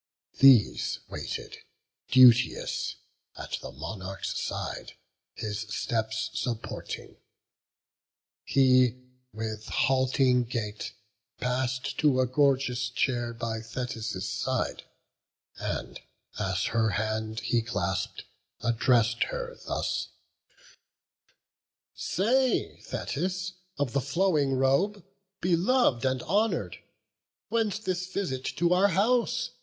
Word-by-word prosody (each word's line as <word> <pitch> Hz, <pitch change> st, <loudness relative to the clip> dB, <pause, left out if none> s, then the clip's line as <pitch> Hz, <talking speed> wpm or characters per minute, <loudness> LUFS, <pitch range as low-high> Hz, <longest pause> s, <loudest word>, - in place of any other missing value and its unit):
These 130 Hz, -6 st, +6 dB
waited, -, -, -6 dB, 0.5 s
duteous, 125 Hz, -2 st, +5 dB, 0.4 s
at -, -, -4 dB
the -, -, -7 dB
Monarch's 95 Hz, +6 st, -5 dB
side, -, -, -4 dB, 0.4 s
His 105 Hz, -1 st, -3 dB
steps 110 Hz, +1 st, -2 dB
supporting; 115 Hz, -3 st, -5 dB, 1.3 s
he, 130 Hz, -2 st, +4 dB, 0.3 s
with 110 Hz, 0 st, -5 dB
halting 130 Hz, -1 st, +2 dB
gait, 110 Hz, -3 st, -4 dB, 0.5 s
Pass'd 130 Hz, +1 st, -1 dB
to 145 Hz, -4 st, +4 dB
a 130 Hz, -, +4 dB
gorgeous 130 Hz, -1 st, +2 dB
chair 120 Hz, -1 st, 0 dB
by 115 Hz, -1 st, -4 dB
Thetis' 110 Hz, -4 st, -4 dB
side, 95 Hz, 0 st, -2 dB, 0.7 s
And, -, -, -4 dB, 0.4 s
as 95 Hz, -2 st, 0 dB
her 115 Hz, -1 st, +3 dB
hand 110 Hz, +2 st, -2 dB
he 120 Hz, -, +1 dB
clasp'd, 115 Hz, +2 st, -2 dB, 0.4 s
address'd 115 Hz, 0 st, +3 dB
her -, -, -5 dB
thus: -, -, -1 dB, 1.9 s
"Say, 250 Hz, +6 st, +1 dB
Thetis 185 Hz, 0 st, -3 dB, 0.2 s
of 145 Hz, -4 st, -1 dB
the 140 Hz, -, +2 dB
flowing 145 Hz, -1 st, +1 dB
robe, 140 Hz, +10 st, +1 dB, 0.4 s
belov'd 175 Hz, -, +3 dB
And 130 Hz, -1 st, 0 dB
honour'd, 215 Hz, +4 st, 0 dB, 0.7 s
whence 225 Hz, -3 st, +1 dB
this 185 Hz, -3 st, -2 dB
visit 150 Hz, -10 st, -2 dB
to 170 Hz, +1 st, +3 dB
our 190 Hz, +3 st, +5 dB
house. 245 Hz, +5 st, +1 dB
130 Hz, 95 wpm, -28 LUFS, 115-175 Hz, 1.9 s, These